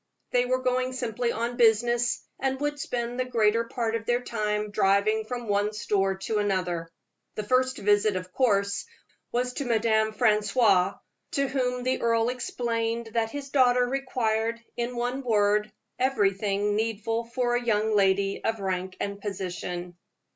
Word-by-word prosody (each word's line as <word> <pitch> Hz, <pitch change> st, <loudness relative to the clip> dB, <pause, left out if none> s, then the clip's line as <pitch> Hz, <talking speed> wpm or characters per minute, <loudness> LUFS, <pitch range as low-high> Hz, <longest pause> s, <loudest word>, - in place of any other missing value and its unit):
They 245 Hz, 0 st, +3 dB
were 255 Hz, +1 st, 0 dB
going 255 Hz, 0 st, 0 dB
simply 240 Hz, -1 st, -1 dB
on 235 Hz, +2 st, -3 dB
business, 240 Hz, +1 st, +3 dB, 0.2 s
and 265 Hz, 0 st, -1 dB
would 295 Hz, 0 st, -2 dB
spend 240 Hz, -2 st, -3 dB
the 255 Hz, -, +1 dB
greater 230 Hz, -2 st, +2 dB
part 230 Hz, -1 st, -2 dB
of 225 Hz, -1 st, -4 dB
their 240 Hz, 0 st, +2 dB
time 210 Hz, -2 st, -2 dB
driving 205 Hz, +2 st, +2 dB
from 240 Hz, 0 st, -5 dB
one 205 Hz, +1 st, +1 dB
store 195 Hz, -2 st, 0 dB
to 215 Hz, -1 st, 0 dB
another. 180 Hz, -5 st, -1 dB, 0.5 s
The 215 Hz, -, -3 dB
first 255 Hz, +4 st, +2 dB
visit, 205 Hz, 0 st, +2 dB
of 185 Hz, 0 st, -5 dB
course, 200 Hz, -, +1 dB, 0.4 s
was 250 Hz, +1 st, -1 dB
to 280 Hz, -, -3 dB
Madame 220 Hz, -2 st, +2 dB
Francoise, 210 Hz, -3 st, +3 dB, 0.4 s
to 275 Hz, 0 st, +1 dB
whom 250 Hz, -2 st, -1 dB
the 255 Hz, +1 st, 0 dB
earl 230 Hz, 0 st, +2 dB
explained 230 Hz, -2 st, -2 dB
that 225 Hz, -1 st, +1 dB
his 280 Hz, +1 st, -7 dB
daughter 250 Hz, -3 st, +4 dB
required, 230 Hz, -4 st, -1 dB, 0.2 s
in 240 Hz, +1 st, -3 dB
one 245 Hz, +3 st, -2 dB
word, 210 Hz, -3 st, +2 dB, 0.3 s
everything 205 Hz, -4 st, +1 dB
needful 225 Hz, +1 st, -1 dB
for 240 Hz, +1 st, 0 dB
a 245 Hz, -, 0 dB
young 220 Hz, -2 st, +1 dB
lady 195 Hz, 0 st, +2 dB
of 225 Hz, -1 st, -1 dB
rank 185 Hz, -1 st, -3 dB
and 200 Hz, 0 st, -4 dB
position. 180 Hz, -3 st, -5 dB
225 Hz, 155 wpm, -27 LUFS, 205-245 Hz, 0.5 s, daughter